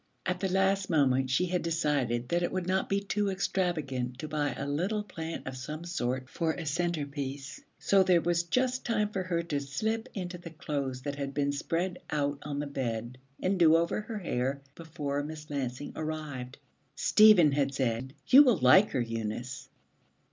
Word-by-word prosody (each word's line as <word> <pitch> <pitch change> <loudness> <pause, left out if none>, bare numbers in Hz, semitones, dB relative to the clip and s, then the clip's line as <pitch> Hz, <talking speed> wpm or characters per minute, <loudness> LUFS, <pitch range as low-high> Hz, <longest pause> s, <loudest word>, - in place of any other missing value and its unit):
At 180 -1 -1
the 190 - -1
last 195 0 +2
moment 135 -5 +3
she 130 +8 +2
had 180 0 -1
decided 140 -7 0
that 175 0 +1
it 175 - 0
would 185 -1 -2
not 190 +1 0
be 195 - +2
too 205 0 -1
extravagant 155 -10 -1
to 155 - -5
buy 150 -2 -1
a - - -4
little 185 +9 -1
plant 165 -5 -6
of 130 - -5
some 150 +5 -6
sort 130 -6 -2
for 160 +4 -1
a 165 - -6
centrepiece. 145 -4 -3 0.2
So 195 -1 +4
there 180 -2 +5
was 170 0 +1
just 255 +8 0
time 215 -3 0
for 195 -2 -2
her 175 -2 -1
to 150 -4 -2
slip 220 - -2
into 180 -2 -5
the 170 - -9
clothes 140 -5 -4
that 145 -1 -4
had 140 -1 -4
been 140 -1 +1
spread 170 +5 -2
out 145 -1 -1
on 145 -1 -5
the 145 - -2
bed, 125 -3 -4 0.2
and 185 0 +1
do 165 -2 +7
over 170 +5 +1
her 215 +1 -6
hair, 140 -6 -2
before 145 -3 -4
Miss 150 0 -8
Lansing 130 -1 -4
arrived. 150 -5 -5 0.4
Stephen 210 -4 +6
had 140 -1 0
said, 130 +1 -1
'You 270 - +9
will 250 -8 +5
like 155 +10 +6
her, 130 - +1
Eunice.' 115 +3 -4
155 Hz, 185 wpm, -30 LUFS, 135-180 Hz, 0.4 s, You